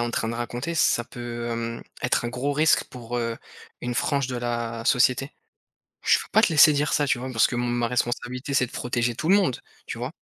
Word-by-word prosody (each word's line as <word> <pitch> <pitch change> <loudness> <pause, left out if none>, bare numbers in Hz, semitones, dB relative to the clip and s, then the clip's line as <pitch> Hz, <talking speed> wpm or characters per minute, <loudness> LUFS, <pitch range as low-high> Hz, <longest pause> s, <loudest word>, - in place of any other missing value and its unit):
en 120 - -2
train 115 - -1
de 115 - -3
raconter, 120 +7 -4
ça 120 - +3
peut, 120 0 -6
hem, 115 0 -4 0.2
être 125 - 0
un 120 - -1
gros 125 +4 -2
risque 155 +2 +3
pour, 120 -1 -7
heu, 115 -1 -2 0.4
une 125 - -3
frange 140 0 0
de 125 - -3
la 120 -1 -3
société. 130 +3 +2 0.7
Je - - +5
peux - - -10
pas 220 - +4
te - - +5
laisser 150 0 +8
dire 145 +1 0
ça, 145 -1 +1
tu 130 - +2
vois? 130 +2 -5
Parce 115 - +4
que 120 - -3
m - - 0
ma 120 -1 0
responsabilité 125 +3 -2
c'est 125 -2 +3
de - - -17
protéger 120 -1 -1
tout 155 - -3
le 195 - +6
monde, 185 -11 +2 0.3
tu - - -6
vois? - - -4
125 Hz, 235 wpm, -25 LUFS, 120-140 Hz, 0.7 s, laisser